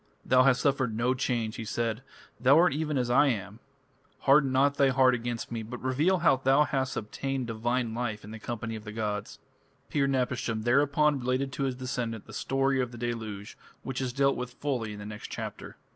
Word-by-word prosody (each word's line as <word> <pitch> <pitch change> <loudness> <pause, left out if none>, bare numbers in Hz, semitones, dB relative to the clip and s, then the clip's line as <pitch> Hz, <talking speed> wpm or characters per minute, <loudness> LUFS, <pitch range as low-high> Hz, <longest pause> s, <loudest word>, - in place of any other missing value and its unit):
"Thou 130 0 +5
hast 130 -1 +4
suffered 130 -6 +1
no 120 +2 +2
change," 120 -4 -2
he - - -4
said, 115 +1 -2 0.4
"thou 135 +4 +5
art 175 -1 +5
even 150 -1 -1
as 125 -1 0
I 145 +4 +5
am. 105 -3 -3 0.6
Harden 140 -1 +5
not 140 +2 +3
thy 140 -1 +4
heart 130 -1 +4
against 120 -1 -3
me, 115 -1 -3
but 120 +3 -7
reveal 145 +9 +2
how 150 -5 +6
thou 135 +3 +4
hast 135 -3 -1
obtained 135 +4 -3
divine 120 +1 -1
life 115 -3 -3
in 105 - -10
the 110 - -8
company 115 0 -4
of 110 - -8
the 105 - -7
gods." 105 -2 -3 0.5
Pir 140 -2 +2
napishtim 125 -4 -1
thereupon 140 +4 +3
related 130 +2 -1
to 135 +1 -2
his 130 -2 -1
descendant 125 -4 -4
the 110 - -12
story 135 +3 +1
of 125 -1 -3
the 120 - -9
deluge, 110 -4 -5 0.3
which 130 0 -4
is 130 -2 -1
dealt 140 +2 +2
with 125 0 -5
fully 125 -7 -2
in - - -8
the 105 - -8
next 105 0 -7
chapter. - - -7
125 Hz, 205 wpm, -28 LUFS, 115-135 Hz, 0.6 s, how